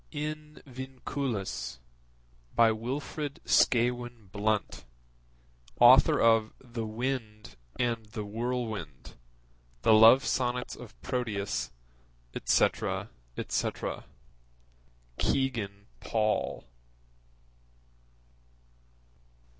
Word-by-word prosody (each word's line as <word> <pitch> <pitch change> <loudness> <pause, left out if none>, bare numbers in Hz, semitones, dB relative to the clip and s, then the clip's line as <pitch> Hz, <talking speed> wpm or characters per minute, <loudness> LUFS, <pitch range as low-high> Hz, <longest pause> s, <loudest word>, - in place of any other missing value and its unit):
In 150 0 -6
Vinculis. 130 - -4 0.8
By 115 -1 +6
Wilfrid 140 +6 -4
Scawen 120 -3 +2
Blunt, 105 -2 -1 1.0
Author - - +7
of 115 -1 +4
The 115 -3 -6
Wind 110 - -4 0.2
and 115 -3 -1
the 105 -1 -6
Whirlwind, 110 - -4 0.7
The 110 - +6
Love 115 +5 +8
Sonnets 125 -1 -1
of - - -12
Proteus, 110 - -2 0.6
etc. - - +1 0.3
etc. - - -2 1.1
(Kegan 110 -7 -1
Paul.) 110 - -1
115 Hz, 65 wpm, -29 LUFS, 110-130 Hz, 1.1 s, Love